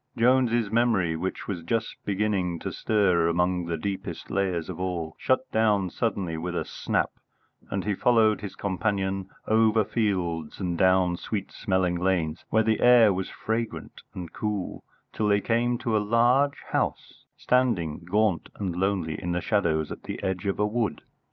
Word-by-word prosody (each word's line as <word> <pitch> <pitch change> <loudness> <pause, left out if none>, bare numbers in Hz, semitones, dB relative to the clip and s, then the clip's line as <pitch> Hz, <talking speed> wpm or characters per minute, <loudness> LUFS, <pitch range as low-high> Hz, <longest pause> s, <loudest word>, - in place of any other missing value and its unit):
Jones's 120 -2 +3
memory, 110 -8 +2
which 95 +4 -4
was 95 -4 -3
just 115 +7 -2
beginning 95 -4 0
to - - -5
stir 95 -6 +2
among 90 +1 +1
the 85 -1 -2
deepest 95 +4 -5
layers 95 -4 0
of 90 -2 -6
all, 85 -4 -3
shut 130 - +2
down 105 -4 +2
suddenly 95 -8 -2
with 85 +2 -4
a - - -1
snap, - - -1 0.6
and 95 -1 -2
he 105 - +1
followed 110 0 +3
his 100 -3 -6
companion 95 0 -1 0.2
over 110 -1 +3
fields 90 -9 -1
and 90 -3 -1
down 95 -1 +3
sweet 100 +1 -4
smelling 95 -4 0
lanes 85 -3 0
where 110 0 +3
the 110 0 +1
air 120 -4 +6
was 95 0 -3
fragrant 115 0 -4
and 85 -3 -7
cool, 105 -3 -3 0.3
till 105 - 0
they 100 0 +4
came 120 +3 +1
to 115 -2 -1
a - - +4
large 120 +7 +3
house, - - -2
standing 115 -12 +1
gaunt 95 +1 0
and 95 -4 -3
lonely 90 -4 -1
in 90 0 -2
the 90 - 0
shadows 85 -7 0
at - - -7
the - - -5
edge 95 +2 -2
of 100 - 0
a 105 - +2
wood. 110 +1 -1
100 Hz, 165 wpm, -26 LUFS, 90-110 Hz, 0.6 s, air